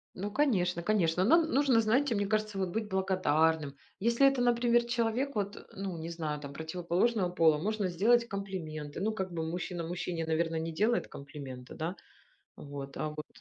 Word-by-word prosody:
Ну, 200 Hz, +3 st, -3 dB
конечно 185 Hz, -, +1 dB
конечно, 180 Hz, -3 st, +2 dB
нам 320 Hz, -, +5 dB
нужно, 265 Hz, -4 st, +4 dB
знаете, 240 Hz, +4 st, +2 dB
мне 205 Hz, -2 st, 0 dB
кажется, 215 Hz, -1 st, -1 dB
вот 190 Hz, -1 st, 0 dB
быть 215 Hz, +4 st, -2 dB
благодарным, 160 Hz, -6 st, +1 dB, 0.2 s
если 235 Hz, +6 st, +4 dB
это, 270 Hz, -2 st, +2 dB
например, 240 Hz, 0 st, +3 dB
человек 240 Hz, +3 st, 0 dB
вот, 205 Hz, 0 st, -3 dB
ну 190 Hz, -3 st, -4 dB
не 165 Hz, +1 st, -5 dB
знаю 155 Hz, -3 st, -3 dB
там, 140 Hz, -1 st, -8 dB
противоположного 180 Hz, +6 st, 0 dB
пола, 165 Hz, -3 st, +4 dB
можно 205 Hz, +4 st, -1 dB
сделать 235 Hz, +7 st, +3 dB
комплименты, 170 Hz, -8 st, -5 dB
ну 215 Hz, +3 st, +1 dB
как 190 Hz, -4 st, -4 dB
бы 165 Hz, -2 st, -3 dB
мужчина 175 Hz, +1 st, -3 dB
мужчине, 170 Hz, -1 st, -3 dB
наверно, 165 Hz, 0 st, 0 dB
не 165 Hz, +1 st, -3 dB
делает 215 Hz, +8 st, +1 dB
комплименты, 140 Hz, -3 st, -9 dB
да. 165 Hz, +4 st, -3 dB, 0.6 s
Вот, 140 Hz, -1 st, -8 dB
а, 155 Hz, -, -2 dB
вот. 150 Hz, 0 st, -7 dB
185 Hz, 170 wpm, -31 LUFS, 160-220 Hz, 0.6 s, нам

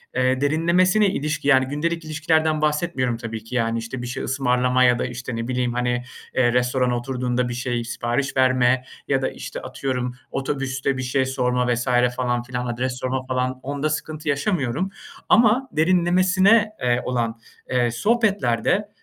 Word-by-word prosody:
eee, 130 Hz, +1 st, +1 dB
derinlemesine 180 Hz, +7 st, +3 dB
ilişki, 155 Hz, -4 st, -2 dB
yani 130 Hz, -2 st, +5 dB
gündelik 165 Hz, +3 st, -2 dB
ilişkilerden 155 Hz, 0 st, +1 dB
bahsetmiyorum 150 Hz, -6 st, 0 dB
tabii 115 Hz, -1 st, -6 dB
ki, 115 Hz, +3 st, -8 dB
yani, 115 Hz, -1 st, +1 dB
işte. 115 Hz, +3 st, -6 dB
Bir 120 Hz, -, -5 dB
şey 125 Hz, -, -4 dB
ısmarlama 125 Hz, -1 st, +2 dB
ya 125 Hz, -1 st, +4 dB
da -, -, 0 dB
işte 125 Hz, -1 st, -5 dB
ne 115 Hz, 0 st, -3 dB
bileyim, 125 Hz, -1 st, -1 dB
hani, 125 Hz, 0 st, -1 dB, 0.3 s
eee, 120 Hz, -2 st, +3 dB
restorana 125 Hz, 0 st, +1 dB
oturduğunda 125 Hz, 0 st, -2 dB
bir -, -, -3 dB
şey 120 Hz, -1 st, -2 dB
sipariş 120 Hz, +4 st, -2 dB
verme 130 Hz, 0 st, +3 dB, 0.2 s
ya 135 Hz, -1 st, +1 dB
da, -, -, 0 dB
işte, -, -, -7 dB
atıyorum 125 Hz, -2 st, -3 dB, 0.2 s
otobüste 135 Hz, 0 st, -2 dB
bir 130 Hz, -, -3 dB
şey 130 Hz, +1 st, +1 dB
sorma 125 Hz, -1 st, 0 dB
vs. 120 Hz, +2 st, -3 dB, 0.3 s
falan 120 Hz, -1 st, -1 dB
filan, 125 Hz, 0 st, -4 dB
adres 125 Hz, +2 st, -2 dB
sorma 130 Hz, 0 st, -2 dB
falan 130 Hz, 0 st, -2 dB
onda 145 Hz, +2 st, -2 dB
sıkıntı 155 Hz, 0 st, -4 dB
yaşamıyorum. 145 Hz, -, 0 dB, 0.4 s
Ama 235 Hz, +4 st, +4 dB
derinlemesine, 185 Hz, +6 st, +3 dB
eee, 125 Hz, 0 st, +1 dB
olan, 115 Hz, -2 st, -1 dB, 0.3 s
eee, 120 Hz, -2 st, +1 dB
sohbetlerde, 200 Hz, -, +1 dB
130 Hz, 160 wpm, -22 LUFS, 125-155 Hz, 0.4 s, yani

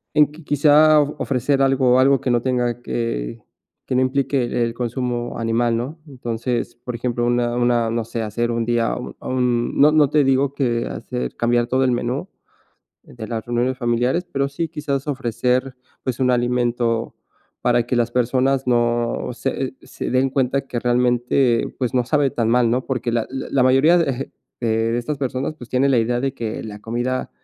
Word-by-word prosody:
en 150 Hz, -1 st, +4 dB
que 160 Hz, +3 st, -13 dB
quizá 150 Hz, +1 st, +5 dB
ofrecer 140 Hz, -2 st, 0 dB
algo 130 Hz, -2 st, +3 dB
algo 135 Hz, +1 st, +4 dB
que 130 Hz, -, -2 dB
no 120 Hz, -1 st, +3 dB
tenga 125 Hz, -2 st, 0 dB
que, 90 Hz, -, -3 dB, 0.4 s
que -, -, -2 dB
no 125 Hz, -, +3 dB
implique 135 Hz, 0 st, +1 dB, 0.2 s
el 115 Hz, 0 st, -1 dB
consumo 120 Hz, 0 st, -3 dB
animal, 115 Hz, 0 st, +1 dB
¿no? 130 Hz, +8 st, -4 dB
Entonces, 120 Hz, -2 st, -3 dB
por 120 Hz, +1 st, -7 dB
ejemplo, 120 Hz, 0 st, -1 dB
una 120 Hz, 0 st, +1 dB
una 120 Hz, -2 st, +2 dB
no 115 Hz, 0 st, -1 dB
sé, 115 Hz, 0 st, -4 dB
hacer 115 Hz, +2 st, -2 dB
un 115 Hz, 0 st, -1 dB
día 115 Hz, 0 st, +1 dB, 0.3 s
un 125 Hz, -2 st, -1 dB
no 150 Hz, +2 st, +6 dB
no 150 Hz, -2 st, +4 dB
te 150 Hz, -2 st, +3 dB
digo 135 Hz, +1 st, +2 dB
que 120 Hz, -4 st, 0 dB
hacer 60 Hz, 0 st, -5 dB
cambiar 120 Hz, 0 st, +1 dB
todo 130 Hz, +2 st, +1 dB
el 130 Hz, -, +2 dB
menú 125 Hz, +8 st, -2 dB, 0.8 s
de 110 Hz, -2 st, -9 dB
las 115 Hz, -2 st, -4 dB
reuniones 120 Hz, +2 st, -1 dB
familiares, 125 Hz, +7 st, 0 dB
pero 140 Hz, 0 st, 0 dB
sí 165 Hz, +4 st, -3 dB
quizás 145 Hz, -3 st, -3 dB
ofrecer, 125 Hz, -1 st, -1 dB, 0.3 s
pues 130 Hz, -2 st, -3 dB
un 130 Hz, -1 st, +2 dB
alimento 120 Hz, -1 st, 0 dB, 0.5 s
para 120 Hz, -1 st, +2 dB
que 125 Hz, -, 0 dB
las 120 Hz, 0 st, +1 dB
personas 130 Hz, +2 st, +1 dB
no 120 Hz, -1 st, +1 dB
se -, -, -3 dB
se -, -, -6 dB
den 130 Hz, +1 st, +2 dB
cuenta 135 Hz, 0 st, 0 dB
que 120 Hz, -, -3 dB
realmente 120 Hz, 0 st, +1 dB
pues 125 Hz, -2 st, -1 dB
no 125 Hz, -1 st, +2 dB
sabe 145 Hz, +1 st, +2 dB
tan 115 Hz, -3 st, -1 dB
mal, 120 Hz, -1 st, +3 dB
¿no?, 125 Hz, +2 st, 0 dB
porque 125 Hz, -3 st, -2 dB
la 115 Hz, -1 st, 0 dB
la 135 Hz, 0 st, -5 dB
la 130 Hz, -, +2 dB
mayoría 135 Hz, +7 st, +5 dB
de 135 Hz, -5 st, -1 dB, 0.3 s
de 115 Hz, -1 st, 0 dB
de 120 Hz, -, 0 dB
estas 145 Hz, +5 st, -4 dB
personas, 135 Hz, +2 st, -3 dB
pues 120 Hz, -6 st, -11 dB
tiene 130 Hz, +2 st, +2 dB
la 130 Hz, -, +3 dB
idea 120 Hz, +2 st, 0 dB
de 135 Hz, +1 st, -1 dB
que 115 Hz, -4 st, -5 dB
la 105 Hz, -1 st, -8 dB
comida, 120 Hz, +4 st, -2 dB
125 Hz, 185 wpm, -21 LUFS, 120-135 Hz, 0.8 s, no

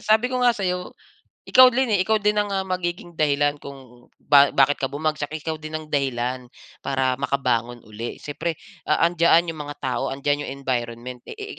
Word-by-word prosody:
sabi 220 Hz, +4 st, +2 dB
ko 255 Hz, -, 0 dB
nga 245 Hz, -, +5 dB
sa'yo 180 Hz, -2 st, -3 dB, 0.5 s
ikaw 255 Hz, 0 st, +8 dB
din 260 Hz, -1 st, +1 dB
eh 195 Hz, -, +2 dB
ikaw 220 Hz, +1 st, +2 dB
din 210 Hz, 0 st, +1 dB
ang, 205 Hz, -, -6 dB
ah, 190 Hz, -1 st, -1 dB
magiging 175 Hz, -1 st, -4 dB
dahilan 145 Hz, -1 st, +2 dB
kung 130 Hz, -3 st, -13 dB
ba 140 Hz, -1 st, +5 dB
bakit 140 Hz, +1 st, +3 dB
ka 135 Hz, -, +2 dB
bumagsak, 150 Hz, -1 st, -2 dB
ikaw 160 Hz, +1 st, -4 dB
din 155 Hz, 0 st, -8 dB
ang 155 Hz, -, -11 dB
dahilan 125 Hz, -3 st, -2 dB, 0.4 s
para 130 Hz, -1 st, 0 dB
makabangon 120 Hz, -4 st, -1 dB
uli. 110 Hz, +2 st, -7 dB
Siyempre, 160 Hz, +3 st, -4 dB, 0.3 s
a 170 Hz, -, +4 dB
andiyan 170 Hz, 0 st, +3 dB
'yung 155 Hz, -, -10 dB
mga 145 Hz, 0 st, -8 dB
tao 130 Hz, -2 st, -2 dB
andyan 145 Hz, +2 st, -1 dB
yung -, -, -5 dB
environment 120 Hz, -1 st, -3 dB
eh, -, -, -8 dB
i 415 Hz, -, -5 dB
145 Hz, 185 wpm, -23 LUFS, 130-175 Hz, 0.5 s, ikaw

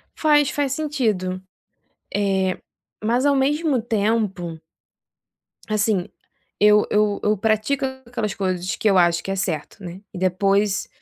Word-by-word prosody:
Faz, 295 Hz, -3 st, +3 dB
faz 275 Hz, 0 st, -1 dB
sentido, 220 Hz, -12 st, -1 dB, 0.7 s
eh, 190 Hz, -2 st, +1 dB, 0.5 s
mas 240 Hz, +5 st, +1 dB
ao 285 Hz, -, +4 dB
mesmo 285 Hz, 0 st, +1 dB
tempo 205 Hz, -6 st, -1 dB, 1.1 s
assim 215 Hz, -3 st, +1 dB, 0.5 s
eu 210 Hz, 0 st, +5 dB
eu 210 Hz, -1 st, +2 dB
eu 210 Hz, 0 st, +2 dB
pratico 220 Hz, +7 st, 0 dB, 0.2 s
aquelas 230 Hz, -4 st, -3 dB
coisas 185 Hz, -2 st, -2 dB
que 215 Hz, -, +1 dB
eu 195 Hz, -, +4 dB
acho 170 Hz, -1 st, +3 dB
que 195 Hz, -, -4 dB
é -, -, -1 dB
certo, 185 Hz, 0 st, -4 dB
né. 180 Hz, +1 st, -8 dB
E -, -, -7 dB
depois 195 Hz, +2 st, +1 dB
210 Hz, 130 wpm, -22 LUFS, 185-240 Hz, 1.1 s, eu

